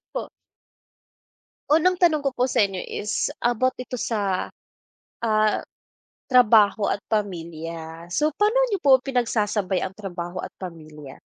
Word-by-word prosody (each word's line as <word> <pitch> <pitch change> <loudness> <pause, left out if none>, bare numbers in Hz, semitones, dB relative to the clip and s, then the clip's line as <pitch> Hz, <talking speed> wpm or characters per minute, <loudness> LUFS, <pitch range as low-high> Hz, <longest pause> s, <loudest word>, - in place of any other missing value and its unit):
Po? - - -4 1.4
Unang 350 +4 +3
tanong 315 -5 +3
ko 275 - +1
po 250 0 0
sa 230 - +3
inyo 195 -2 -2
is 210 +3 -2 0.2
about 245 +2 +1
ito 250 -1 -6
sa, 200 -5 -1 0.7
ah, 215 -2 +2 0.7
trabaho 220 -6 +5
at - - 0
pamilya. 165 -4 -4
So 300 - +1
pa'no 420 +7 +2
niyo 400 -6 -2
po 270 -2 +6
pinagsasabay 220 -7 0
ang 190 +1 -4
trabaho 180 -3 -6
at - - -6
pamilya? 155 -6 -10
215 Hz, 125 wpm, -24 LUFS, 180-255 Hz, 1.4 s, po